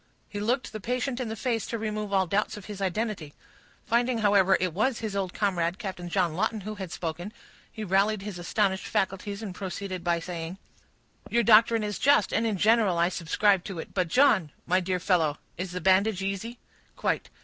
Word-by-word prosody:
He 205 - -6
looked 245 +5 -1
the 215 - -4
patient 250 +4 -2
in 250 -3 -3
the 220 - -4
face 230 -1 -1
to 230 - -3
remove 215 -1 -3
all 190 -1 +3
doubts 205 +4 -1
of 205 - -10
his 205 -2 -7
identity; 195 -5 -2 0.5
finding, 240 +1 +1
however, 200 -3 +4
it 180 -2 -1
was 225 +6 +1
his 215 -3 -4
old 190 -2 -1
comrade, 180 -4 0
Captain 180 -4 -6
John 170 -1 +1
Lawton, 215 +4 -1
who 215 +3 -5
had 190 -5 -7
spoken, 175 +4 -4 0.4
he 220 - -6
rallied 200 +1 +2
his 200 -4 -6
astonished 190 +2 0
faculties, 200 +2 -2
and 200 -4 -5
proceeded 190 -1 -5
by 170 -1 +1
saying,— 170 +1 -6 0.7
"Your 235 0 +2
doctrine 225 +1 +5
is 210 -2 -3
just, 285 -7 +4
and 225 +1 +2
in 210 -3 -1
general 215 -3 +3
I 170 +1 +3
subscribe 185 +2 +2
to 195 - -6
it. 160 - -7
But, 185 -3 +1
John, 200 - +4 0.2
my 180 +2 +3
dear 185 0 -1
fellow, 165 -5 +1 0.2
is 185 +1 -4
the 180 - -4
bandage 195 +1 +3
easy?" 200 +5 -3 0.4
"Quite." - - -1
200 Hz, 195 wpm, -27 LUFS, 180-220 Hz, 0.7 s, doctrine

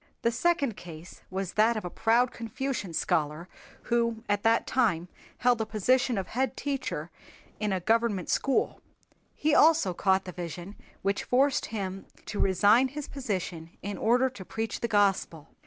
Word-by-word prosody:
The 235 - +3
second 280 - +1
case 170 -1 -11
was 190 -1 -4
that 220 +2 +3
of 215 - -4
a - - -3
proud 235 +2 +2
Confucian 230 -3 -4
scholar 155 +1 -1 0.4
who 235 -1 0
at 205 -1 +1
that 225 +1 +3
time 185 -9 +1 0.3
held 245 -2 +2
a - - 0
position 245 +3 +2
of 190 -1 -3
head 260 +3 -1
teacher 265 - -3 0.5
in 210 -1 -1
a 190 - 0
government 220 -1 +1
school. 270 - 0 0.5
He 305 0 +1
also 310 - +5
caught 190 +2 +2
the 180 - -6
vision 175 +2 -7 0.3
which 200 +1 0
forced 270 +2 +2
him 195 -3 -5 0.2
to 205 - -5
resign 205 +7 +4
his 285 +2 -6
position 185 - -5
in 200 +1 -4
order 245 +3 +3
to 250 -7 -8
preach 225 +4 -4
the 235 - -1
Gospel. 195 -7 +1
215 Hz, 160 wpm, -28 LUFS, 185-245 Hz, 0.5 s, also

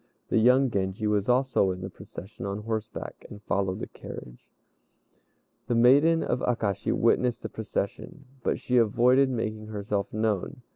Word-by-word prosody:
The - - +3
young 125 +3 +4
Genji 95 +1 -2
was 105 +1 +1
also 130 -5 +3
in 90 0 -4
the 95 - -5
procession 95 +3 -10
on 100 +2 -4
horseback, 110 0 -5
and 105 - -10
followed 95 -2 -1
the - - -2
carriage. - - -11 1.2
The 120 - +1
maiden 145 +8 +5
of 125 - -1
Akashi 110 -6 -1
witnessed 120 +1 +2
the - - -4
procession, 110 - -5 0.2
but - - 0
she 125 - 0
avoided 125 +4 +4
making 110 -3 -3
herself 105 -1 -3
known. 110 +2 -2
110 Hz, 150 wpm, -27 LUFS, 100-125 Hz, 1.2 s, maiden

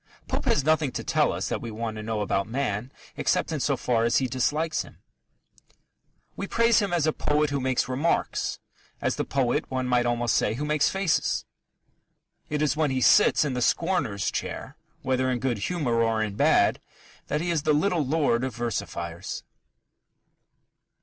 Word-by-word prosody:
Pope - - -2
has 145 - +2
nothing 155 -2 +2
to - - -4
tell - - +2
us - - -3
that - - -2
we 115 - -5
want 110 0 -4
to - - -5
know 110 -1 -2
about 100 -1 0
man 120 -1 -2 0.2
except - - 0
in - - -2
so - - +1
far 115 -2 +1
as 115 0 +3
he 135 - +2
dislikes 150 +5 0
him. - - -12 1.4
We - - -4
praise 230 -1 +4
him 200 -3 -1
as 175 -3 +1
the 155 0 +2
poet 150 0 +1
who 140 - 0
makes 130 -1 0
remarks 135 +6 0 0.4
as - - 0
the - - -1
poet, 130 -3 0
one 130 -1 -2
might 125 -1 +2
almost 120 -1 +1
say, - - +1
who 145 +5 -3
makes 150 0 +2
faces. 190 -3 0 1.0
It 150 0 0
is 145 -1 +1
when 155 -1 +1
he 130 -1 0
sits 210 +1 +5
in 140 - -1
the 125 - -2
scorner's 120 - 0
chair, - - -5 0.3
whether 130 -1 +1
in 125 - 0
good 120 -3 -1
humour 120 - 0
or 115 -1 +1
in 105 -2 -3
bad, - - +3 0.5
that 150 - -1
he 175 +1 -1
is 165 -3 +1
the 155 +1 +1
little 165 +2 +2
lord 140 -4 +1
of 130 -4 -3
versifiers. 85 -7 -4
130 Hz, 185 wpm, -26 LUFS, 115-150 Hz, 1.4 s, sits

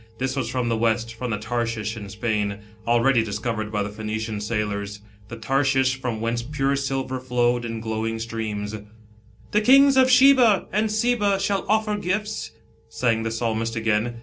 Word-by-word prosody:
This 130 +2 -2
was 130 -4 -2
from 125 -1 -1
th* 115 -1 0
West, 115 0 0
from 125 +2 -5
the 105 - -1
Tarshish 115 0 -3
in 105 -3 -8
Spain, 105 0 -1
1 100 0 -7 0.3
already 120 0 +3
dis 105 -2 -4
covered 110 -1 -3
by 105 -1 0
the 100 - -5
Phoenician 110 0 -4
sailors, 105 -2 -3 0.3
the 115 - -7
Tarshish 130 +2 +1
from 120 -4 -3
whence 115 +1 -1
pure 135 +2 -1
silver 135 -1 -2
flowed 120 -1 0
in 115 -1 -4
glowing 110 0 -2
streams. 110 -2 -4 0.4
" 110 0 -28
The 210 - +3
kings 275 +3 +6
of 260 0 +5
Sheba 250 -5 +6
and 210 +1 +1
Seba 215 -3 +1
shall 195 0 -1
offer 215 -1 +1
gifts," 210 +3 -2 0.4
sang 115 -3 0
the 115 - -2
Psalmist 115 0 -2
again. 115 +1 0
115 Hz, 175 wpm, -23 LUFS, 110-135 Hz, 0.4 s, kings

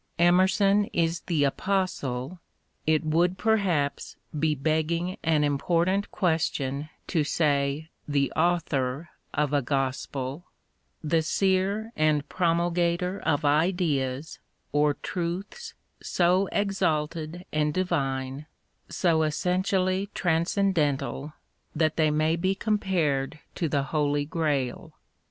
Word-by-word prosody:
Emerson 190 +4 +4
is 165 0 +1
the 160 -5 +2
apostle^t 150 -3 -1 0.6
would, 170 +4 +2
perhaps, 185 -11 0 0.2
be 155 0 +2
begging 160 +5 0
an 155 -2 +2
important 170 +7 +1
question 155 -4 -1 0.2
to 160 -5 +1
say 145 0 0 0.2
the 140 -2 +1
author 160 -3 0 0.2
of 150 0 0
a 145 - +3
gospel 135 +3 -2 0.3
— - - -20
^the 160 +1 +2
seer 195 +5 +1
and 150 -2 +2
promulgator 175 +1 +1
of 145 0 0
ideas, 150 -3 0 0.3
or 145 0 +2
truths 190 - -5 0.3
so 180 +2 +2
exalted 170 -4 -1
and 150 0 +1
divine, 140 -5 -2 0.4
so 165 -3 +2
essentially 185 +4 0
transcendental, 165 -5 0 0.4
that 155 0 +1
they 155 -1 +3
may 155 +2 +2
be 185 +3 0
compared 180 -10 0 0.2
to 165 - -2
the 140 -2 +1
Holy 145 0 0
Grail. 145 -5 -2
160 Hz, 100 wpm, -27 LUFS, 145-180 Hz, 0.6 s, Emerson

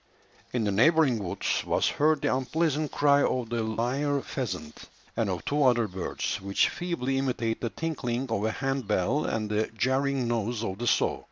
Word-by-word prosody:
In 120 -3 0
the 105 - +1
neighbouring 130 +1 +4
woods 85 - -1
was - - +1
heard 150 0 +2
the - - +2
unpleasant 150 +3 0
cry 145 -1 +4
of 125 -4 0
the 120 -1 -1
lyre 125 +6 0
pheasant 95 - -5 0.3
and 110 -3 0
of 90 -3 -3
two 145 0 +1
other 120 -4 +4
birds, 95 +1 -3
which 100 0 +2
feebly 135 -7 -2
imitate 120 -4 -1
the 115 - -1
tinkling 130 -5 -3
of 105 -2 0
a 110 - +1
hand 135 -1 -2
bell 105 +8 +1
and 110 -1 -1
the 105 +1 +1
jarring 130 +1 +1
noise 115 0 -1
of 95 -2 -4
the 120 - -2
saw. - - +2
120 Hz, 180 wpm, -28 LUFS, 110-140 Hz, 0.3 s, neighbouring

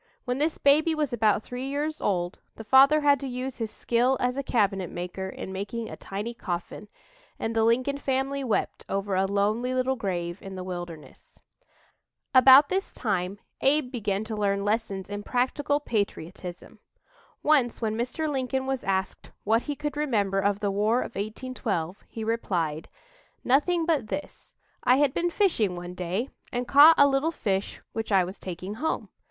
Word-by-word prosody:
When 250 +1 -1
this 310 +2 0
baby 310 +3 +4
was 300 -4 -1
about 220 -2 +2
three 250 +2 -5
years 295 +3 -2
old, 175 -3 -1 0.2
the 225 - -8
father 275 +6 +6
had 285 -2 +4
to 275 - -5
use 255 +1 -5
his 225 -2 -2
skill 245 +4 +1
as 250 0 0
a 275 - -1
cabinet 200 - 0
maker 180 +2 -5
in 190 - -7
making 210 +4 -4
a - - -6
tiny 210 +4 -5
coffin, 180 0 -5 0.5
and 225 0 -3
the 225 - +3
Lincoln 255 +5 +2
family 270 +1 -1
wept 235 -5 -1
over 195 0 -2
a 190 +1 +2
lonely 215 +6 0
little 255 +1 +1
grave 175 -5 -3
in 195 -1 -8
the 185 - -5
wilderness. 175 -3 -9 0.9
About 265 +2 +8
this 380 +4 -2
time 195 -3 -1 0.2
Abe 275 -1 +2
began 210 -5 -1
to 220 0 -5
learn 200 -1 0
lessons 205 -3 -1
in 205 0 -5
practical 270 +5 0
patriotism. 195 - -4 0.6
Once 275 -6 +3
when 220 -2 -1
Mr. 250 +7 -2
Lincoln 265 -2 -1
was 265 -1 -2
asked 190 -1 -2
what 225 +3 +3
he 290 +2 -4
could 295 0 -4
remember 210 -10 +1
of 200 +1 0
the 200 -1 0
War 215 +5 +2
of - - -6
1812, 205 -4 -4
he 225 - -6
replied: 175 -9 -2 0.5
"Nothing 325 +6 +2
but 315 -9 +1
this: 295 - -7 0.3
I 250 - +5
had 285 -2 +3
been 350 - 0
fishing 325 - +1
one 175 0 -7
day 185 +8 -3 0.2
and 245 0 -2
caught 295 +4 +8
a 285 - +7
little 275 +3 +1
fish 195 -10 -2
which 225 -1 -4
I 190 -2 +5
was 185 +2 -7
taking 185 +2 -6
home. 320 - -1
230 Hz, 170 wpm, -27 LUFS, 195-270 Hz, 0.9 s, About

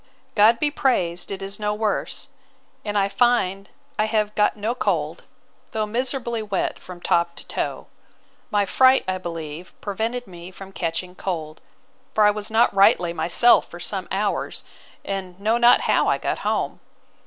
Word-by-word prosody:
'God 220 +2 +6
be 295 +3 +1
praised 180 - 0
it 195 -1 -5
is 195 +1 -6
no 210 0 -1
worse! 215 -1 -2 0.5
And 210 -1 -2
I 195 -1 +3
find 200 -4 +1 0.3
I 215 - +4
have 215 -1 0
got 210 0 +2
no 215 +3 -1
cold, 250 - -1 0.5
though 215 -1 0
miserably 235 +1 -2
wet 205 -3 -2
from 180 -1 -10
top 170 0 +1
to - - -8
toe. - - -3 0.6
My 205 -1 +2
fright, 260 +6 +5
I 185 0 -1
believe, 165 -1 -7
prevented 225 +5 -3
me 175 -1 -10
from 190 +1 -11
catching 180 0 -3
cold: 160 -5 -5 0.5
for 215 - +4
I 210 - +6
was 210 0 -4
not 225 0 +3
rightly 185 -3 +4
myself 205 +8 +4
for - - -10
some - - -3
hours, - - -1 0.4
and 190 -2 -5
know 220 +4 +1
not 240 0 +6
how - - +2
I - - +3
got - - -2
home. - - -1
205 Hz, 165 wpm, -23 LUFS, 180-225 Hz, 0.6 s, God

